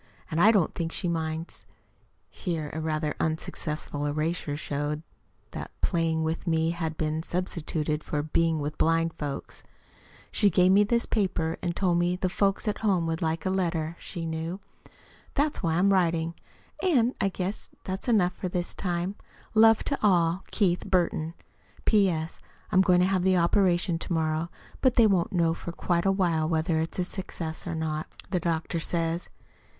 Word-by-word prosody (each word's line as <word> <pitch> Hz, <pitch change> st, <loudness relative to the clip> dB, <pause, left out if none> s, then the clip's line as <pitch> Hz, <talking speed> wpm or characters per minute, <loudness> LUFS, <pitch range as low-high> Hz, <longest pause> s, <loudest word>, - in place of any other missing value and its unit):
And 160 Hz, +2 st, +1 dB
I 215 Hz, -, +8 dB
don't 195 Hz, -8 st, +2 dB
think 165 Hz, -1 st, -3 dB
she 180 Hz, -, -1 dB
minds 160 Hz, 0 st, -3 dB, 0.6 s
(here 160 Hz, -5 st, -3 dB
a 160 Hz, -, -3 dB
rather 155 Hz, -1 st, -1 dB
unsuccessful 155 Hz, -2 st, -2 dB
erasure 155 Hz, 0 st, -1 dB
showed 150 Hz, +1 st, -3 dB, 0.5 s
that -, -, -6 dB
"playing 165 Hz, -2 st, +1 dB
with 160 Hz, +3 st, -2 dB
me" 160 Hz, 0 st, +2 dB
had 165 Hz, -2 st, -3 dB
been 155 Hz, 0 st, -1 dB
substituted 160 Hz, -3 st, -2 dB
for 145 Hz, -1 st, -2 dB
"being 165 Hz, +1 st, +1 dB
with 150 Hz, +1 st, -4 dB
blind 165 Hz, 0 st, +2 dB
folks"). 145 Hz, -2 st, -5 dB, 0.7 s
She 205 Hz, -, +4 dB
gave 180 Hz, +1 st, +4 dB
me 200 Hz, +2 st, +6 dB
this 235 Hz, +3 st, +1 dB
paper, 185 Hz, -6 st, 0 dB
and 175 Hz, -1 st, -2 dB
told 175 Hz, -3 st, +2 dB
me 175 Hz, +1 st, +2 dB
the 185 Hz, 0 st, -1 dB
folks 195 Hz, +2 st, +1 dB
at 210 Hz, -, 0 dB
home 190 Hz, -6 st, +2 dB
would 165 Hz, +1 st, -2 dB
like 160 Hz, +1 st, -1 dB
a 190 Hz, -, +1 dB
letter, 170 Hz, -4 st, -1 dB
she 170 Hz, -3 st, -5 dB
knew. 165 Hz, +3 st, -3 dB, 0.8 s
That's 290 Hz, +1 st, +1 dB
why 165 Hz, -4 st, +1 dB
I'm 195 Hz, +3 st, +4 dB
writing 170 Hz, -3 st, +1 dB, 0.5 s
it. 365 Hz, -4 st, +2 dB
And 240 Hz, +2 st, +3 dB
I 195 Hz, -, +3 dB
guess 185 Hz, +2 st, -3 dB
that's 190 Hz, +4 st, -5 dB
enough 195 Hz, -7 st, +3 dB
for 185 Hz, -, -4 dB
this 175 Hz, 0 st, -1 dB
time. 175 Hz, +1 st, -2 dB, 0.4 s
Love 225 Hz, 0 st, +6 dB
to 280 Hz, -, -1 dB
all. 180 Hz, -3 st, +3 dB
KEITH 180 Hz, -4 st, +1 dB
BURTON 170 Hz, -3 st, +1 dB, 0.5 s
P.S. 180 Hz, -7 st, +2 dB, 0.3 s
I'm 185 Hz, -, +5 dB
going 180 Hz, -2 st, +4 dB
to -, -, +5 dB
have 190 Hz, -1 st, +1 dB
the 185 Hz, 0 st, +3 dB
operation 175 Hz, 0 st, +2 dB
to -, -, -5 dB
morrow, 160 Hz, 0 st, 0 dB, 0.3 s
but 260 Hz, -2 st, +3 dB
they 230 Hz, -, +6 dB
won't 190 Hz, -5 st, +2 dB
know 170 Hz, -3 st, +2 dB
for 170 Hz, -, -6 dB
quite 170 Hz, +1 st, 0 dB
a -, -, +5 dB
while 170 Hz, -5 st, +1 dB
whether 160 Hz, 0 st, +1 dB
it's 170 Hz, +3 st, -1 dB
successful 175 Hz, -2 st, -4 dB
or -, -, -3 dB
not, 155 Hz, -1 st, -2 dB, 0.2 s
the 180 Hz, -, +2 dB
doctor 165 Hz, 0 st, -1 dB
says. 165 Hz, +1 st, -1 dB
170 Hz, 170 wpm, -27 LUFS, 160-185 Hz, 0.8 s, I